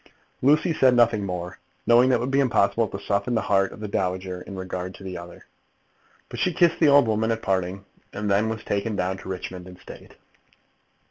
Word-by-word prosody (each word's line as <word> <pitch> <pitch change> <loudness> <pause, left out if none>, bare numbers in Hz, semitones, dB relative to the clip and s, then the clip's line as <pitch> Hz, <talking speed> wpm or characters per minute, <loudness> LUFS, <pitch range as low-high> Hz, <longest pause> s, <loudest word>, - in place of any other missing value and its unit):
Lucy 150 +5 +3
said 130 -4 +4
nothing 115 -3 +3
more, 90 -1 -5 0.3
knowing 120 +2 +5
that 130 - +4
it - - 0
would 125 +2 -2
be 135 - +2
impossible 115 -4 +2
to 100 - -6
soften 100 +4 -1
the 110 - +1
heart 95 -1 +1
of - - -12
this 105 -1 -6
dowager 90 -1 -2
in 100 - -9
regard 95 0 -5
to - - -13
the 95 -1 -6
other. 85 0 -10 0.8
But - - -8
she 180 - +1
kissed 170 0 +3
the 160 - +5
old 140 -2 +6
woman 110 +1 0
at 115 0 -2
parting, 95 0 -2 0.3
and 105 0 -4
then 105 +2 +2
was 110 -1 -5
taken 105 +2 -2
down 95 0 -1
to - - -10
Richmond 90 -1 -6
in 90 -1 -12
state. - - -13
100 Hz, 210 wpm, -24 LUFS, 95-120 Hz, 0.8 s, old